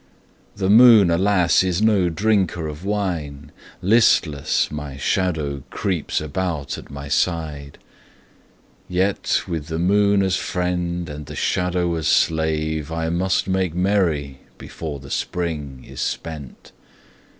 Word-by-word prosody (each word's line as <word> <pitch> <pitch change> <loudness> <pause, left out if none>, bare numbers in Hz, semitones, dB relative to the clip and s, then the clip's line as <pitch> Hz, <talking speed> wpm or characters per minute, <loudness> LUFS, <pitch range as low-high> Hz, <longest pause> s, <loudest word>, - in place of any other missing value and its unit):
The 95 -2 -1
moon, 110 -3 +7
alas, 90 0 +3
is 90 -1 0
no 105 -5 +3
drinker 95 -2 0
of 75 +2 -8
wine; 85 -9 -3 0.3
Listless, 90 -8 +3
my 75 -2 -6
shadow 75 -2 -1
creeps 90 -7 -2
about 75 -1 -3
at - - -13
my 70 +1 -8
side. 75 -2 -2 1.1
Yet 95 +2 0
with 80 -5 -4
the 80 -1 -3
moon 100 +3 +3
as 95 -1 +1
friend 90 -1 -2
and 75 -1 -8
the - - -8
shadow 90 -1 0
as 80 -2 -2
slave 80 -1 +1
I 80 0 -2
must 95 +3 0
make 95 -3 0
merry 85 -8 0 0.2
before 75 -4 -7
the 70 +1 -12
Spring 75 -7 -3
is - - -7
spent. 75 -6 -6
85 Hz, 125 wpm, -21 LUFS, 75-95 Hz, 1.1 s, moon